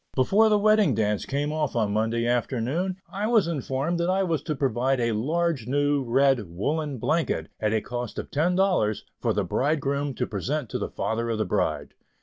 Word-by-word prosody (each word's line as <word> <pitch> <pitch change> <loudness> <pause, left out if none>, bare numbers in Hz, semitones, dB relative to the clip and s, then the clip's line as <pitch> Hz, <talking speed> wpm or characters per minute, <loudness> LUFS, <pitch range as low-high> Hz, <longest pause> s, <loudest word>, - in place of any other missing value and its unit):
Before 200 - +4
the 210 - +4
Wedding 210 - +4
Dance 105 -2 0
came 145 +2 -1
off 155 -4 -1
on 105 -3 +1
Monday 115 +2 0
afternoon, 130 +9 -1 0.2
I 205 +2 -1
was 220 -7 +3
informed 150 +2 -2
that 170 +1 0
I 190 +1 +2
was 165 -6 0
to 155 0 -3
provide 130 -1 0
a 115 -1 +1
large 150 +3 -1
new 145 +1 +1
red 130 -4 +2
woollen 145 - -2
blanket, 160 +8 -1
at 105 -1 0
a 110 -1 +1
cost 120 0 -5
of - - -5
ten 165 +5 +1
dollars, 180 - +1
for - - 0
the - - 0
bridegroom 140 -1 -1
to - - -1
present 125 +6 -3
to - - -2
the - - -3
father 115 +1 -2
of 115 - -1
the 110 - 0
bride. - - -1
140 Hz, 195 wpm, -26 LUFS, 115-165 Hz, 0.2 s, Before